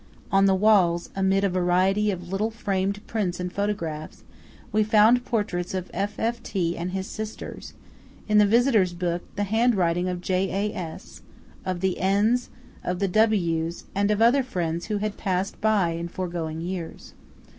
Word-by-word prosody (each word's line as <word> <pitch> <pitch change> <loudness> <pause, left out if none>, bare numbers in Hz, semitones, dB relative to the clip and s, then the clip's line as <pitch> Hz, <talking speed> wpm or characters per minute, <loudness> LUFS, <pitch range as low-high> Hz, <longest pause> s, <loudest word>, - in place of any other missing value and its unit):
On 195 0 +5
the 190 - +4
walls, 185 -4 +3
amid 195 0 +2
a 200 - +3
variety 185 +3 +2
of 180 -3 -4
little 200 +4 0
framed 200 -2 -2
prints 190 -6 -2
and 180 0 -4
photographs, 170 -7 -3 0.5
we 215 0 +3
found 220 +3 +5
portraits 190 -6 -2
of 185 -1 -4
F.F.T., 200 -3 -2
and 175 +2 -3
his 190 +1 -3
sisters; 215 +1 -7 0.5
in 210 -1 +4
the 205 - +6
visitor's 225 -5 +3
book, 175 0 -2
the 205 - 0
handwriting 190 -5 +2
of 180 -1 -3
J.A.S., 185 -1 -3 0.4
of 185 -2 -3
the 190 -1 0
N's, 210 +6 +2 0.3
of 180 - -2
the 195 +1 0
W's 175 -5 +1
and 200 +1 +1
of 210 +1 +3
other 250 +4 +5
friends 170 -8 -3
who 210 -1 -1
had 210 0 -3
passed 190 -1 -2
by 210 -5 +3
in 170 +1 -4
foregoing 170 -3 -4
years. 175 -1 -6
195 Hz, 155 wpm, -25 LUFS, 175-210 Hz, 0.5 s, the